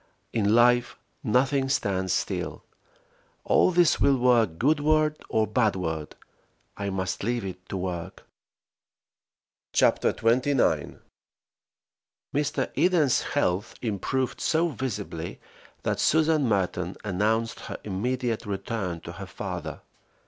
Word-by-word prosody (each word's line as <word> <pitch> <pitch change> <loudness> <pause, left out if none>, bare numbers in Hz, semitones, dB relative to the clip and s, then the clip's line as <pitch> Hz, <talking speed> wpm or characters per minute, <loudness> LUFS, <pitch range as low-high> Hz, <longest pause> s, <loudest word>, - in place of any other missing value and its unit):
In 110 -1 +2
life 120 0 +4 0.3
nothing 135 +3 +2
stands 95 -8 0
still; - - -2 0.8
all - - +4
this 175 -2 +3
will 140 -1 +4
work 120 -9 +3
goodward 155 - +2
or 110 0 +2
badward. 95 -9 -1 0.6
I 100 0 -3
must 95 -1 -2
leave 120 -1 -1
it 90 -1 -8
to 95 - -3
work. 90 -2 -5 1.5
CHAPTER - - +3
XXIX. 125 +4 +1 1.3
MR. 140 -2 0
EDEN'S 165 -8 +3
health 100 -9 -1
improved 120 +4 -2
so 165 +1 +2
visibly 130 -5 -5 0.4
that - - -1
Susan 155 -3 +3
Merton 90 -3 -1
announced 110 +3 0
her - - -6
immediate 115 +3 -2
return 95 -3 -3
to - - -8
her - - -8
father. - - -6
115 Hz, 105 wpm, -26 LUFS, 95-135 Hz, 1.5 s, life